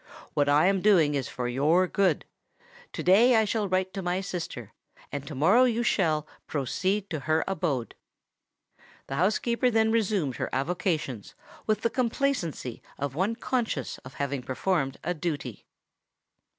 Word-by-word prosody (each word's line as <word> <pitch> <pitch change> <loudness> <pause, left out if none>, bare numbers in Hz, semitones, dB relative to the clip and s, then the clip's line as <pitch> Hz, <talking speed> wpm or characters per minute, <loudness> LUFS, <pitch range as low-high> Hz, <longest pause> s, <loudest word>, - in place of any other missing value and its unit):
What 145 -1 +2
I 145 +3 +5
am 195 0 +2
doing 175 -8 +4
is 135 -3 -2
for 125 -1 -3
your 150 +9 +3
good: 185 -3 +1 0.7
to - - -4
day 225 +7 +6
I 220 -1 +4
will 210 -3 -1
write 185 0 0
to 195 - -4
my 180 0 -1
sister—and 145 - -7
to 150 - -6
morrow 190 - +5
you 240 -1 +1
shall, 155 -9 +1 0.2
proceed 185 - -1
to 160 - -2
her 155 +3 +1
abode." 160 -11 -2 1.1
The 135 - -5
housekeeper 235 +7 +2
then 220 -1 +3
resumed 200 - 0
her - - -2
avocations 150 - -2 0.3
with 215 -1 +1
the 230 - 0
complacency 235 - -1 0.2
of 140 -1 -3
one 190 +9 0
conscious 230 - -2
of 130 - -13
having 140 -1 -2
performed 135 +2 -1
a 175 - -1
duty. 150 - -5
175 Hz, 150 wpm, -27 LUFS, 140-210 Hz, 1.1 s, day